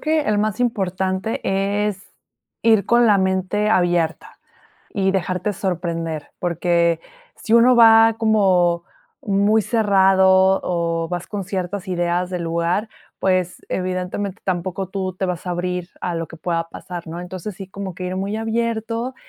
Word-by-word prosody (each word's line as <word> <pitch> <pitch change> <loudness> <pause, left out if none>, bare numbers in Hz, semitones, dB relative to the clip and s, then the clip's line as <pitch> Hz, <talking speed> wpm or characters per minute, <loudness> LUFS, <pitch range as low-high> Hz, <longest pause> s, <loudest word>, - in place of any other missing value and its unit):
que 310 0 +1
el 215 -7 0
más 215 +1 -1
importante 190 -3 -1 0.5
es 195 -2 -6 0.5
ir 220 -3 +4
con 240 0 +4
la 205 -3 +5
mente 190 +3 0
abierta 175 -5 0 0.5
y 195 -1 +1
dejarte 190 +1 -1
sorprender, 165 -4 -3
porque 170 -1 +1 0.4
si 225 - -3
uno 240 +2 +6
va 225 -1 +7
como 185 -6 +3 0.4
muy 205 +1 +3
cerrado 190 -3 +4
o 170 -1 -1
vas 175 -1 -4
con 205 -2 -4
ciertas 185 0 -4
ideas 175 0 -1
de 180 -1 -3
lugar, 170 +5 -1 0.3
pues 185 -2 0
evidentemente 185 +2 -3
tampoco 185 +1 -2
tú 190 0 -3
te 185 +2 -2
vas 180 -1 -4
a - - -3
abrir 180 0 -3
a 175 -2 -3
lo 165 -1 -3
que 165 - -12
pueda 165 0 -2
pasar, 175 0 -8
¿no? 165 +2 -6
Entonces, 185 +2 -7
sí 195 0 -8
como 195 -1 -6
que 185 +2 -6
ir 180 +1 -3
muy 195 +2 -2
abierto 230 +2 -2
190 Hz, 150 wpm, -21 LUFS, 175-210 Hz, 0.5 s, va